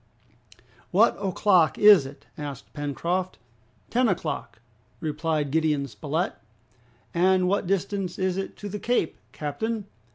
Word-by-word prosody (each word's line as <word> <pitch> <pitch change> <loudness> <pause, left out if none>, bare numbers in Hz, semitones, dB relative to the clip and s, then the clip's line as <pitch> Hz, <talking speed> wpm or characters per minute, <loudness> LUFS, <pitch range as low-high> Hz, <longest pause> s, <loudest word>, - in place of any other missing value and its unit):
"What - - +4
o'clock 185 -4 +3
is 205 -9 +7
it?" 140 +1 -13
asked 140 -3 -7
Pencroft. 170 +6 -2 0.5
"Ten 250 +1 +3
o'clock," 155 - -3 0.4
replied 155 -2 -1
Gideon 155 -2 +1
Spilett. 145 - -2 0.8
"And 185 +1 +3
what 195 -1 0
distance 195 -1 -1
is 185 -1 0
it 195 0 -4
to 205 - -6
the 205 +1 -5
Cape, 240 -6 0
captain?" 215 +9 -3
175 Hz, 120 wpm, -26 LUFS, 150-195 Hz, 0.8 s, is